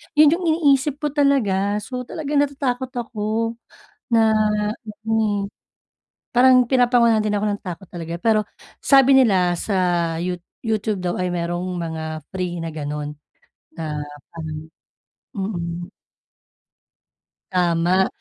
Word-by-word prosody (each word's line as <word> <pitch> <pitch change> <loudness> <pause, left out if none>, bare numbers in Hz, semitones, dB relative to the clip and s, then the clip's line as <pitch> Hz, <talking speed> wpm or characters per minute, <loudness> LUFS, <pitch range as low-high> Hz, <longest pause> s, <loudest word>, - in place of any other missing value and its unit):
yun 300 0 +7
yung 350 +1 0
iniisip 290 -3 +2
ko 295 - 0
talaga. 210 -9 +2
So 250 +1 -6
talagang 295 -2 -1
natatakot 265 -3 -1
ako 230 0 -2 0.5
na 225 -1 +5 0.7
mm. 215 -3 0 0.9
Parang 255 0 +7
pinapangunahan 240 -3 +4
din 210 -1 0
ako 205 - -1
ng 205 0 -1
takot 180 0 -7
talaga. 170 -1 -5
Pero 215 0 +2 0.3
sabi 270 -1 +5
nila 190 -7 +4
sa 175 -4 0
You 180 0 -2 0.2
YouTube 215 -4 -1
daw 175 0 -1
ay 180 - 0
merong 175 +1 -2
mga 160 -2 -4
free 180 -2 -3
na 165 - -4
ganun 150 -1 -5 0.6
na 155 -2 -4 0.4
parang 155 -2 -5 0.8
mm. 175 -3 -3 1.7
Tama. 180 +1 +2
205 Hz, 115 wpm, -22 LUFS, 175-245 Hz, 1.7 s, yun